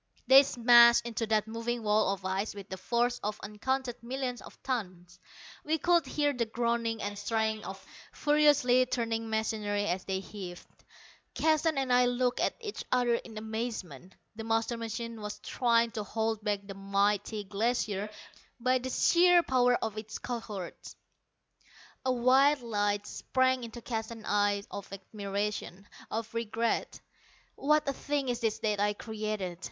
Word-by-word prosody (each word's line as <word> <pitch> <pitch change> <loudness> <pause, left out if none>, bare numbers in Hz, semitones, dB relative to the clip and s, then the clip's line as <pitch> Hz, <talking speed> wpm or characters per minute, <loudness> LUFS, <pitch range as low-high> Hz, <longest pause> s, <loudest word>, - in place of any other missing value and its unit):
They 265 +2 +9
smashed 240 -3 +6
into 230 -1 -3
that 215 -1 +2
moving 230 +1 -3
wall 210 -1 +3
of 195 -1 -5
ice 195 +3 -2
with 200 0 -9
the 190 - -5
force 240 +5 0
of 210 0 -3
uncounted 245 +4 -3
millions 250 0 -4
of - - -13
tons. 180 -8 -4 0.4
We 315 +1 +1
could 345 +1 +2
hear 290 -1 +1
the 235 -3 -1
groaning 230 -1 -1
and 205 0 -3
straining 220 0 -1
of 190 0 -7 0.3
furiously 290 -4 +4
turning 230 -2 -2
machinery 215 -2 -1
as 180 -1 -1
they 190 -1 -1
heaved. 190 -2 -8 0.7
Keston 315 -1 +2
and 265 -2 +1
I 250 0 +5
looked 245 0 0
at - - +1
each 425 -3 -6
other 245 -1 +3
in 230 -1 -4
amazement. 215 - -5 0.2
The 225 - -6
master 225 +1 0
machine 230 0 -5
was 210 0 -5
trying 235 -2 +1
to 220 - -4
hold 220 +1 -2
back 205 -2 0
the 195 - -7
mighty 200 +2 0
Glacier 210 0 -1 0.5
by 255 +2 +2
the 260 +1 -5
sheer 350 +5 +5
power 250 -3 +3
of 220 -1 -3
its 215 0 -7
cohorts! 215 -7 -6 1.1
A - - +4
wild 260 +3 +4
light 205 -2 0
sprang 260 +1 0
into 235 0 -8
Keston's 225 -1 -5
eye 205 -1 +2
of 200 -1 -7
admiration, 200 0 -4 0.2
of 225 0 -4
regret. 230 0 -1 0.5
"What 300 +1 +2
a 275 - +1
thing 285 -1 -2
is 240 -1 -1
this 225 -2 0
that 210 -2 +1
I 205 0 +2
created!" 215 -5 -4
225 Hz, 155 wpm, -30 LUFS, 205-245 Hz, 1.1 s, They